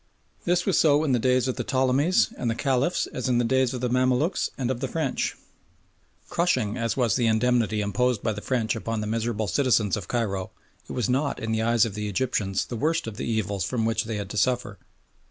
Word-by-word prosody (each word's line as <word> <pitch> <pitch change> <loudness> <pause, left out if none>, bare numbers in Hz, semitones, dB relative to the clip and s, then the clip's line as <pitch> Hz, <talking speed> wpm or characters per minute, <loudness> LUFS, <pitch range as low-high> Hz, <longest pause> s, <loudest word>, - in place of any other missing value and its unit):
This 175 +1 +2
was 195 - +2
so 150 -1 +4
in 150 - 0
the 125 - +3
days 130 +1 +2
of 130 - -2
the - - -1
Ptolemies 135 +6 +2
and 120 - -2
of 115 - -4
the - - -5
Caliphs 135 +5 +1
as 130 0 -2
in 125 - +2
the 120 - +2
days 130 +1 +2
of 125 -2 -5
the 125 - +1
Mamaluks 130 +6 +1
and 130 -1 -1
of 125 - -3
the 135 - -2
French. 150 -1 -2 0.9
Crushing 170 -12 0
as 115 0 -2
was 120 -5 +2
the 120 -3 +2
indemnity 110 -1 +2
imposed 115 +2 0
by 110 - 0
the 105 - -6
French 120 -3 0
upon 115 0 -3
the - - -3
miserable 110 0 -1
citizens 115 -5 +2
of 100 -6 -6
Cairo, 100 -6 -2 0.4
it - - -5
was 120 -5 0
not 140 +3 0
in 110 - -3
the 110 0 0
eyes 115 0 +3
of 110 - -4
the 105 0 -3
Egyptians 100 -3 -1
the 120 - -6
worst 160 +7 0
of 110 -2 -7
the - - -4
evils 100 -4 -1
from 115 +3 -1
which 115 0 0
they 110 0 -3
had 100 -1 -5
to 105 - -5
suffer. 120 -2 0
120 Hz, 230 wpm, -25 LUFS, 110-130 Hz, 0.9 s, so